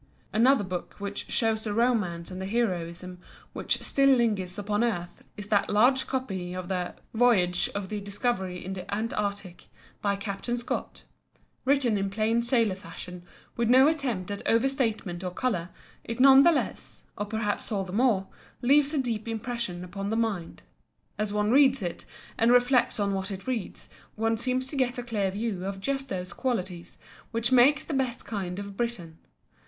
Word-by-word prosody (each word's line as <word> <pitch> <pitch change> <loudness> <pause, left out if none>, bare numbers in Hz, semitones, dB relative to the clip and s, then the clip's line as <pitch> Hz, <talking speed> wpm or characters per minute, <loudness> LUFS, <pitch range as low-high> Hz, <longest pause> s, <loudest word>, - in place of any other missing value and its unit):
Another 245 +1 +4
book 180 -2 -5
which 200 0 -5
shows 225 -2 +1
the 210 -2 -2
romance 210 -8 +1
and 185 +1 -6
the 190 - -3
heroism 180 -5 -2 0.3
which - - -2
still 275 0 +3
linger 225 -8 +3
upon 205 +2 0
earth 175 -7 -3
is 205 0 -7
that 205 -2 +2
large 250 +5 +4
copy 190 -9 -3
of 185 0 -5
the 180 -2 -2 0.2
"Voyage 205 -7 +3
of 200 -2 -3
the 210 - -3
Discovery 195 -3 -2
in 190 - -4
the 185 -1 -7
Antarctic" 205 -3 -3 0.3
by 200 -1 +1
Captain 200 +4 -3
Scott. 240 - -4 0.6
Written 255 -6 +3
in 195 0 -1
plain 220 +3 +1
sailor 235 -4 +2
fashion 180 -1 -9 0.3
with 235 -1 0
no 260 +3 +7
attempt 250 - -1
at 200 - -4
over 230 +3 +4
statement 220 -9 -2
or 180 - -1
colour, 180 -3 -2 0.3
it 230 +1 -5
none 270 +1 +9
the 340 - +6
less 320 - -3
(or 205 -1 -3
perhaps 215 +1 -2
all 200 -2 0
the 185 -1 -8
more) 220 -4 +3 0.4
leaves 285 +4 +4
a - - +1
deep 230 -5 -2
impression 225 -5 -3
upon 195 +2 -5
the 220 - 0
mind. 215 -7 -2 0.6
As 210 -1 -1
one 210 +1 +1
reads 270 -3 +5
it, 175 -1 -4 0.3
and 230 +1 +5
reflects 245 -1 +4
on 200 -1 +1
what 190 +1 -2
one 195 -2 -4
reads, 250 -6 -4 0.3
one 225 +1 +1
seems 255 +3 -1
to 270 - -8
get 255 -2 0
a 245 - -3
clear 210 -5 -1
view 200 -1 -3
of 195 0 -4
just 270 +5 -2
those 185 -1 -4
qualities 185 -9 -3 0.3
which 230 +1 -1
make 260 +4 +6
the 315 - -5
best 260 -3 -1
kind 190 -4 -4
of 200 0 -6
Briton. 190 -9 -4
215 Hz, 175 wpm, -27 LUFS, 190-245 Hz, 0.6 s, none